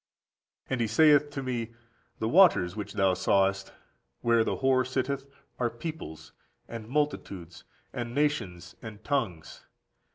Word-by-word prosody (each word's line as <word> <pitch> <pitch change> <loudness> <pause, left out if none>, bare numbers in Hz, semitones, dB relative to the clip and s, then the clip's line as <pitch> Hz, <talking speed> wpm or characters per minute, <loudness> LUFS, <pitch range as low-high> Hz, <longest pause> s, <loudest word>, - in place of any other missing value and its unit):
39. - - -5
"And 125 - 0
he 115 - +1
saith 145 +5 +5
to 140 -2 -5
me, 120 -3 -4 0.4
The 110 - -2
waters 130 - +5
which 105 -2 -6
thou 95 -1 +3
sawest, 95 +1 +1 0.5
where 115 -1 +3
the - - -2
whore 130 -1 +3
sitteth, 135 +2 -2 0.3
are 120 -1 +1
peoples, 120 - -8 0.4
and 115 -2 -8
multitudes, 100 - -3 0.3
and 120 0 -5
nations, 145 - -1
and 110 -1 -10
tongues. 110 - -3
120 Hz, 135 wpm, -28 LUFS, 100-140 Hz, 0.5 s, saith